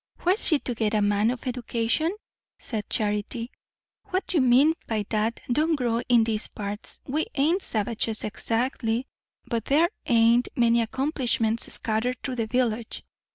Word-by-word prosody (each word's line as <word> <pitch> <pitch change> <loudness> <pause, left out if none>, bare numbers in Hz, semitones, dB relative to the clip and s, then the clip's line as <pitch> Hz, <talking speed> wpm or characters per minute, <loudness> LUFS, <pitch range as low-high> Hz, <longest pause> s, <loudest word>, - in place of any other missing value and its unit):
"Where's 370 +5 +2
she 310 - +5
to 255 - -3
get 220 -1 0
a 210 - +2
man 205 +2 +2
of 245 0 -4
education?" 245 +5 0 0.5
said 215 -4 -5
Charity. 215 +3 -1 0.5
"What 370 0 -2
you 325 - +4
mean 260 +5 +5
by 215 -2 -1
that 220 +1 0
don't 310 +5 +2
grow 240 -4 0
in 240 -2 +6
these 220 -1 0
parts. 205 +1 -6
We 305 +4 -1
ain't 320 +7 +2
savages 220 - -1
exactly, 230 +2 -1 0.4
but 230 -2 -2
there 315 +5 +3 0.2
ain't 235 +1 +4
many 235 -1 +4
accomplishments 235 -2 0
scattered 230 +3 -1
through 255 -2 -3
the 225 -1 -1
village. 235 -2 -1
235 Hz, 150 wpm, -26 LUFS, 220-260 Hz, 0.5 s, in